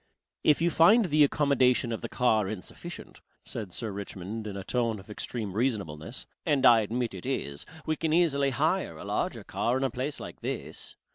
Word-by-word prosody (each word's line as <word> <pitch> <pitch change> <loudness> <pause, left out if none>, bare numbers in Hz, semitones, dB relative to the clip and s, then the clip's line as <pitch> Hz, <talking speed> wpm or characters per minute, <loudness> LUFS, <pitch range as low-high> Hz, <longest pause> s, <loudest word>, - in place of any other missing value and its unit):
"If 150 +2 +4
you 170 - +3
find 210 +9 +6
the 155 -3 +4
accommodation 130 -4 +3
of 115 - -3
the - - -5
car 110 -5 +2
insufficient," 105 -4 -8 0.2
said 105 -5 -5
Sir 110 +3 -3
Richmond 100 +2 -6
in 100 -1 -5
a 95 - -5
tone 115 0 0
of 100 +3 -12
extreme 105 -2 -4
reasonableness, 100 - -2 0.2
and 140 -3 +2
I 115 -1 +8
admit 115 +2 -1
it 95 - -7
is, 70 0 -3 0.2
we 155 - 0
can 160 -1 -1
easily 150 -5 +3
hire 150 - 0
a - - -8
larger - - -2
car 120 +2 0
in 135 - -1
a 135 - +1
place 130 +4 -3
like - - -8
this. - - -5
120 Hz, 190 wpm, -28 LUFS, 105-145 Hz, 0.2 s, I